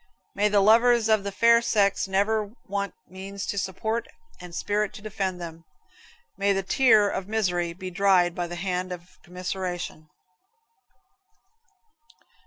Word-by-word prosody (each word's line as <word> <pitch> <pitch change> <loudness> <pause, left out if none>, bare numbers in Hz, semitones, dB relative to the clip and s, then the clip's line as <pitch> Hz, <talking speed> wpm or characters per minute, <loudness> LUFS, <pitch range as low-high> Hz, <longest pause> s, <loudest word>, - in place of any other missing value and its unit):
May 210 +1 +2
the 205 -1 +3
lovers 230 +2 +5
of 215 -2 +3
the 200 - -3
fair 230 +3 +5
sex 200 -4 +1
never 205 +2 +1 0.2
want 200 0 -3
means 195 +2 -7
to 205 - -3
support 220 +5 -2 0.3
and 175 -1 -10
spirit 210 +2 -1
to - - -10
defend 195 -4 -3
them. 165 -1 -8 0.8
May 200 0 +3
the 195 0 -1
tear 220 -1 +4
of 190 -1 -3
misery 180 -6 0
be 185 +1 -7
dried 185 -2 +3
by 175 -1 -3
the 175 - -6
hand 180 0 -3
of 175 0 -10
commiseration. 180 -3 -5
195 Hz, 140 wpm, -26 LUFS, 180-210 Hz, 0.8 s, lovers